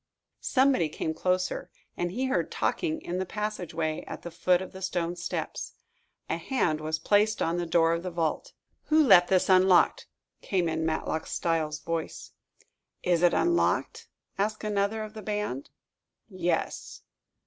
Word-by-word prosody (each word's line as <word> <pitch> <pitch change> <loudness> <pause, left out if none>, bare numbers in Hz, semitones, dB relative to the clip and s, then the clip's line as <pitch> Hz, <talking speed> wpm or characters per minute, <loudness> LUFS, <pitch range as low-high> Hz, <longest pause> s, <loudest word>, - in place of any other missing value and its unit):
Somebody 260 - +2
came 160 +1 -3
closer, 180 +3 -1 0.3
and 175 - -1
he 245 +9 -2
heard 260 +1 0
talking 315 -3 -1
in 180 +1 -3
the 190 - -1
passageway 180 -7 -3
at - - -7
the 175 - -6
foot 180 +2 +2
of 190 - -7
the 190 - -10
stone 175 -2 -2
steps. 170 - -4 0.5
A - - -1
hand 170 - 0
was 155 +1 -1
placed 210 +6 +2
on 165 +1 0
the 175 -1 -2
door 165 0 +3
of 170 - -1
the 185 - -4
vault. 165 -3 -2 0.3
"Who 310 0 +4
left 175 -10 +7
this 185 -1 +2
unlocked?" 185 -1 +4 0.3
came 180 -3 0
in 160 0 -1
Matlock 160 0 -2
Styles' 155 -2 -1
voice. 165 0 -4 0.7
"Is 175 -2 +2
it 175 -1 +4
unlocked?" 345 0 +1 0.3
asked 215 +2 -1
another 210 +1 0
of 215 0 -8
the 215 - -8
band. 210 -11 -3 0.6
"Yes." - - -3
180 Hz, 155 wpm, -28 LUFS, 165-210 Hz, 0.7 s, left